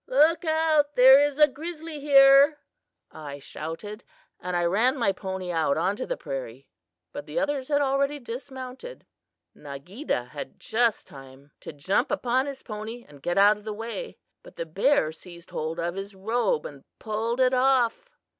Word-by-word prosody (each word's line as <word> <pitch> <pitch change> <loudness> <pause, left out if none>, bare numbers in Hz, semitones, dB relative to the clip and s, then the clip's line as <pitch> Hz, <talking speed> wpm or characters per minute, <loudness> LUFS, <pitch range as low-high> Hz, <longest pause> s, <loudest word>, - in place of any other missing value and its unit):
'Look 310 +6 +3
out! 315 -2 +2
there 265 +2 +8
is 290 -1 -1
a 300 -1 +7
grizzly 315 +2 -7
here,' 280 +1 +6 0.5
I 145 -3 -8
shouted, 185 - -8 0.4
and 180 0 -4
I 175 - +1
ran 225 +10 +2
my 230 -6 +2
pony 190 -1 -5
out 160 -4 +1
on 190 +5 0
to - - -4
the - - -3
prairie; 135 -1 -7 0.4
but 145 - -8
the 150 - -6
others 290 -3 -1
had 290 -1 +1
already 275 +1 0
dismounted. 260 - -8 0.5
"Nageedah 140 - -5
had 145 - -8
just 230 -1 0
time 135 +1 -14
to - - -8
jump 190 - 0
upon 260 -1 0
his 275 -1 -7
pony 220 +2 -7
and 145 -2 -16
get 175 +5 -2
out 205 +1 +6
of 210 - -16
the 215 0 -5
way, 230 - -6 0.2
but - - -16
the 165 - -4
bear 190 - +2
seized 170 +2 -13
hold 160 +1 -4
of 170 +1 -2
his 195 +1 -7
robe 240 - 0
and - - -9
pulled 225 +2 -3
it 255 0 +3
off. 260 - +2
230 Hz, 170 wpm, -26 LUFS, 175-280 Hz, 0.5 s, there